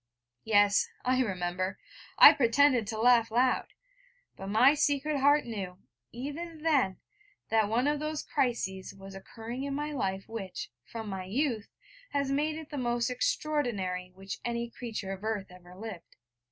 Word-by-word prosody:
Yes, 205 -2 +4 0.2
I 255 +1 +3
remember: 185 -3 -2 0.4
I - - +11
pretended 250 -2 +3
to 220 0 -4
laugh 235 -1 +5
loud! 245 +3 +2 0.7
But 195 - -8
my 235 +8 +5
secret 290 -1 +1
heart 285 +2 +4
knew, 195 -6 -5 0.3
even 305 +6 -6
then, 275 -12 +2 0.5
that 220 -2 +2
one 235 +4 +1
of 295 0 +1
those 305 0 -3
crises 230 -9 -2
was 195 0 -11
occurring 225 +6 -7
in 280 0 -3
my 295 +1 -3
life 195 -8 -2
which, 195 - -6 0.2
from 225 -2 -5
my 190 -2 -4
youth, 230 +1 -1 0.5
has 280 -1 0
made 300 +3 0
it 315 -1 -9
the 290 - -3
most 240 0 0
extraordinary 245 - -1
which 195 +1 -7
any 235 0 -3
creature 220 -5 -5
of 195 +1 -7
earth 215 -4 -3
ever 180 0 -14
lived. 200 -3 -9
235 Hz, 155 wpm, -30 LUFS, 195-280 Hz, 0.7 s, I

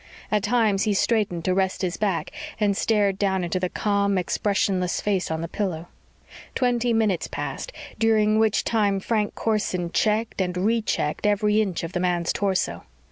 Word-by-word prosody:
At 210 -1 +2
times 210 -1 +2
he 210 -2 +1
straightened 195 -6 0
to 185 - +2
rest 190 0 0
his 180 -1 -1
back 195 -5 -1 0.3
and 205 -2 +2
stared 205 -2 +1
down 190 -2 +1
into 175 +2 -1
the 180 0 -1
calm, 200 -1 +1
expressionless 185 0 0
face 195 -3 -1
on 160 0 -2
the 165 - -3
pillow. 175 -3 -3 0.7
Twenty 245 -1 +1
minutes 215 -6 +1
passed, - - -5 0.3
during 215 -1 +3
which 220 -2 +2
time 205 -3 +1
Frank 210 +1 -1
Corson 190 -6 -1
checked 220 0 0
and 180 -1 -2
rechecked 210 -4 0
every 210 +1 +3
inch 190 -6 -2
of 165 - -4
the 180 - -2
man's 175 -1 0
torso. 190 - -1
200 Hz, 165 wpm, -24 LUFS, 180-215 Hz, 0.7 s, during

